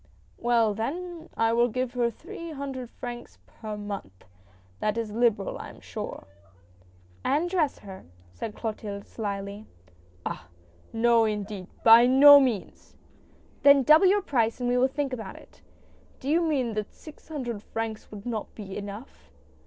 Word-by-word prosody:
"Well 230 -3 +2
then 330 - -5
I 225 0 +2
will 240 +1 +4
give 255 +1 -2
her 240 -2 +1
three 335 +6 -9
hundred 270 -4 -5
francs 240 0 -8
per 215 -2 -8
month! 200 - -7 0.5
That 215 +1 -1
is 225 -2 -3
liberal, 225 -3 +1
I - - -7
am - - -14
sure." - - -7 1.0
"And 305 +5 +1
dress 345 -6 0
her," 190 -2 -11 0.3
said 210 - -6
Clotilde, 210 -3 -5
slyly. 200 -1 -5 0.6
"Ah! 80 - -5 0.4
No 230 0 +4
indeed! 210 -3 -4 0.2
by 230 +2 +8
no 285 +3 +9
means." 245 -8 -2 0.3
" - - -31
Then 280 -1 +7
double 310 +8 +7
your 400 +1 +3
price 235 - 0
and 245 - -1
we 245 0 +2
will 260 - +4
think 275 0 -3
about 220 -6 -6
it." - - -17 0.3
" - - -31
Do 270 - -5
you 330 +3 +3
mean 275 -8 0
that 210 -1 -4
six 310 -1 -14
hundred 250 -9 -4
francs 225 0 -5
would 210 0 -10
not 225 -3 -4
be 195 -3 -8
enough 205 +5 -9
235 Hz, 160 wpm, -27 LUFS, 210-275 Hz, 1.0 s, no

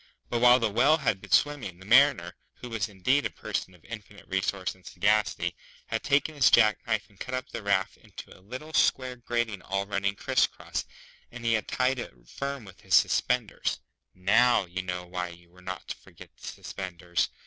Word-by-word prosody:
But 120 - +1
while 125 0 +8
the 115 -4 0
Whale 135 +9 +4
had 115 -10 0
been - - -12
swimming, 140 -12 +2
the 95 - -14
Mariner, 115 -7 +5 0.2
who 125 - -9
was 110 -2 -2
indeed 130 +9 +1
a - - -1
person 95 - -4
of 85 - -23
infinite 105 -2 -10
resource 95 -1 -1
and 95 - -23
sagacity, 100 -5 +1 0.3
had - - -2
taken 140 +2 +2
his 140 -4 +5
jack 110 -3 +5
knife 110 -1 +1
and 100 -3 -25
cut 130 - -4
up 130 - -4
the 115 - -5
raft 100 -2 0
into - - -12
a - - -18
little 130 +10 -8
square 130 -3 +2
grating 120 -4 -2
all 100 +1 -2
running 100 0 -1
criss - - +2
cross, - - -5 0.5
and 120 0 -9
he 115 - +3
had 110 -3 0
tied 130 0 +1
it 120 - -7
firm 140 -3 -5
with 95 -2 -14
his - - +2
suspenders 125 -4 +2 0.4
(now, 100 +4 +4
you 90 +1 -4
know 90 -1 -4
why 90 0 -3
you 85 0 -14
were 90 +1 -18
not 95 0 -6
to - - -4
forget - - -16
the - - -12
suspenders!) 90 -2 -3
105 Hz, 200 wpm, -28 LUFS, 95-125 Hz, 0.5 s, while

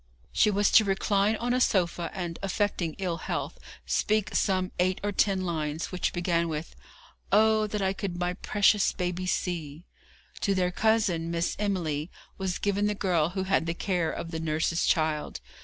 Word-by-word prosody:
She 215 - +4
was 205 0 +2
to 220 - +7
recline 200 +1 +1
on 240 +2 -1
a 255 - +1
sofa, 175 -5 +1
and, 175 -3 -5
affecting 195 -4 -1
ill 180 -3 -2
health, - - -4 0.3
speak 215 -1 0
some 185 -2 +1
eight 185 +1 +2
or 205 - 0
ten 195 -1 +1
lines, 155 -2 -3
which 185 - -1
began 170 -1 0
with, 155 +1 -5 0.6
'Oh, 215 +1 +4
that 210 -1 -2
I 190 0 +1
could 190 -2 -4
my 180 0 -1
precious 205 +1 +2
baby 180 0 -3
see!' 165 -3 -3 0.5
To 200 -2 +1
their 180 -1 +1
cousin, 205 -6 +1
Miss 170 0 -1
Emily, 170 -7 -1 0.3
was 190 -2 -1
given 205 0 0
the 210 - 0
girl 175 -6 +1
who 190 - +1
had 190 -3 +1
the 165 - -1
care 175 -3 0
of 165 - -5
the 160 - -3
nurse's 160 +2 0
child. 155 -3 0
185 Hz, 175 wpm, -28 LUFS, 170-200 Hz, 0.6 s, to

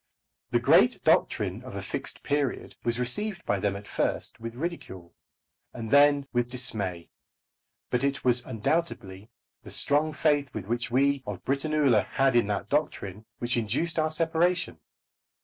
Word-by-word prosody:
The - - +2
great - - +5
doctrine - - +2
of - - -9
a - - -3
"Fixed - - -5
Period" 140 -2 -1
was 120 0 0
received 190 - -2
by 100 - +1
them 100 0 0
at 100 +1 -8
first - - -2
with 115 0 -6
ridicule, 120 - -6 0.6
and 115 -1 -6
then 145 0 +5
with 120 0 +1
dismay; 100 -9 -4 0.8
but 125 +1 +1
it 140 0 0
was 120 -1 +3
undoubtedly 110 - -2 0.3
the - - -12
strong 150 +2 +1
faith 145 -2 +1
which 120 +4 -2
we 140 +3 +2
of 100 -3 -6
Britannula 140 -5 +2
had 135 -2 +1
in 120 -3 +4
that 100 -2 -2
doctrine 110 -9 -2
which 120 0 -1
induced 135 +10 -1
our 155 0 +2
separation. 165 - 0
125 Hz, 150 wpm, -27 LUFS, 110-150 Hz, 0.8 s, great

